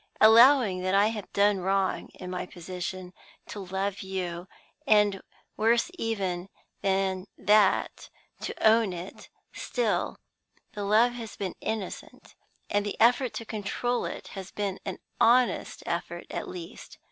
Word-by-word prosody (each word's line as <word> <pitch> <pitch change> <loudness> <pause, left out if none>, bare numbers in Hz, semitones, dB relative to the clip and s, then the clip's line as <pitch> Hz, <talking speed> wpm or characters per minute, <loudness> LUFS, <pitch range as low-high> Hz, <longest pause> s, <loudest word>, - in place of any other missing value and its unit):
Allowing 225 -3 +7
that 185 +1 0
I 205 +2 +5
have 210 -4 -6
done 200 0 +3
wrong 190 +1 0
(in 180 -1 -8
my 180 0 -4
position) 180 +1 -6 0.3
to 210 - -8
love 190 +2 -3
you, 185 -2 -4 0.4
and, 210 -2 +4 0.3
worse 230 +8 +2
even 195 - -3 0.3
than 190 -1 0
that, 210 -2 +2 0.3
to - - 0
own 220 -3 +4
it, 175 +2 -9 0.2
still - - -1 0.6
the 205 -1 -4
love 220 +4 +4
has 230 -3 -7
been 190 -3 -4
innocent, 220 -4 -6 0.3
and 205 0 +1
the 205 - -5
effort 245 +2 +4
to 230 - -5
control 220 +3 -2
it - - -6
has 195 -2 -8
been 200 -2 -3
an 190 -3 -4 0.2
honest 235 -3 +3
effort 175 0 -4
at - - -4
least. 180 +2 -9
200 Hz, 135 wpm, -28 LUFS, 185-220 Hz, 0.6 s, Allowing